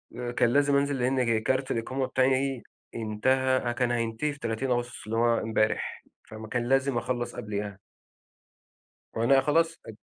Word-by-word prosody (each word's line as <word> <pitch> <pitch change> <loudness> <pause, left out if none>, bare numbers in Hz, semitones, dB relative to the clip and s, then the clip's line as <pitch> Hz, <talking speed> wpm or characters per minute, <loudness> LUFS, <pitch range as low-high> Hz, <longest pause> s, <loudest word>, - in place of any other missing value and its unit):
آآ 120 -1 -4
كان 120 - +2
لازم 145 0 +3
أنزل 140 -1 +1
لإن 130 +1 +1
جِ 115 -2 +1
كارت 130 0 0
الإقامة 130 +3 -1
بتاعي 130 0 +1 0.3
انتهى 130 +4 +1
أ - - +1
كان 120 0 0
هينتهي 115 +5 -1
في 145 - -14
30 115 +3 -2
أغسطس 120 -4 -2
اللي 115 +1 -2
هو 115 0 +3
امبارح، 110 0 -1 0.3
فم 110 0 -8
كان 120 +2 -2
لازم 135 -1 +2
أخلّص 120 0 -2
قبليها. 100 -1 -5 1.4
وأنا 135 +4 +4
خلاص 165 +3 +1
أج 110 - -9
125 Hz, 160 wpm, -27 LUFS, 115-135 Hz, 1.4 s, وأنا